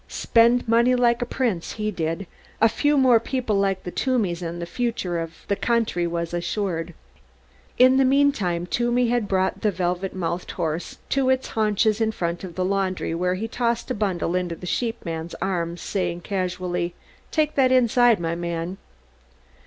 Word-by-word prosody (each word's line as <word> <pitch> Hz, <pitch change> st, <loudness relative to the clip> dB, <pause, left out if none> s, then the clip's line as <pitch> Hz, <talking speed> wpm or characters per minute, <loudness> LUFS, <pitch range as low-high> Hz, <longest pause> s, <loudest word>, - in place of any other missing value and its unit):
Spent 235 Hz, +1 st, +3 dB
money 235 Hz, +2 st, +4 dB
like 240 Hz, -1 st, +2 dB
a 245 Hz, -, -1 dB
prince 230 Hz, -10 st, -1 dB
he 215 Hz, -1 st, -2 dB
did. 165 Hz, +1 st, -3 dB, 0.3 s
A 225 Hz, -, +6 dB
few 290 Hz, +6 st, +1 dB
more 255 Hz, -4 st, +6 dB
people 240 Hz, -2 st, -2 dB
like 195 Hz, -1 st, +1 dB
the 180 Hz, -, -5 dB
Toomeys 210 Hz, -10 st, 0 dB
and 170 Hz, 0 st, -4 dB
the 170 Hz, -, -3 dB
future 185 Hz, -3 st, -2 dB
of 165 Hz, 0 st, -7 dB
the 200 Hz, -, +1 dB
country 225 Hz, -7 st, 0 dB
was 170 Hz, 0 st, -3 dB
assured. 175 Hz, -1 st, -2 dB, 0.8 s
In 255 Hz, +1 st, +6 dB
the 270 Hz, -, +5 dB
meantime 260 Hz, -11 st, +2 dB
Toomey 240 Hz, +4 st, +1 dB
had 240 Hz, -3 st, +1 dB
brought 190 Hz, 0 st, 0 dB
the 215 Hz, -, +2 dB
velvet 180 Hz, 0 st, -2 dB
mouthed 175 Hz, -1 st, -3 dB
horse 165 Hz, -1 st, -3 dB
to 270 Hz, -1 st, +2 dB
its 260 Hz, 0 st, +1 dB
haunches 215 Hz, 0 st, +1 dB
in 220 Hz, 0 st, +2 dB
front 170 Hz, -4 st, -3 dB
of 175 Hz, -3 st, -7 dB
the 185 Hz, -, 0 dB
laundry 190 Hz, -3 st, -1 dB
where 180 Hz, +2 st, 0 dB
he 215 Hz, +4 st, -3 dB
tossed 235 Hz, +1 st, -1 dB
a -, -, +2 dB
bundle 190 Hz, -6 st, -1 dB
into 180 Hz, -2 st, -1 dB
the 180 Hz, -, -10 dB
sheepman's 170 Hz, -7 st, -3 dB
arms, 175 Hz, -3 st, -2 dB
saying 175 Hz, -3 st, -2 dB
casually; 180 Hz, -2 st, -2 dB, 0.3 s
"Take 305 Hz, -1 st, +1 dB
that 260 Hz, -2 st, +3 dB
inside, 245 Hz, -3 st, +4 dB
my 165 Hz, -1 st, -1 dB
man." 170 Hz, +2 st, -4 dB
195 Hz, 170 wpm, -24 LUFS, 175-235 Hz, 0.8 s, A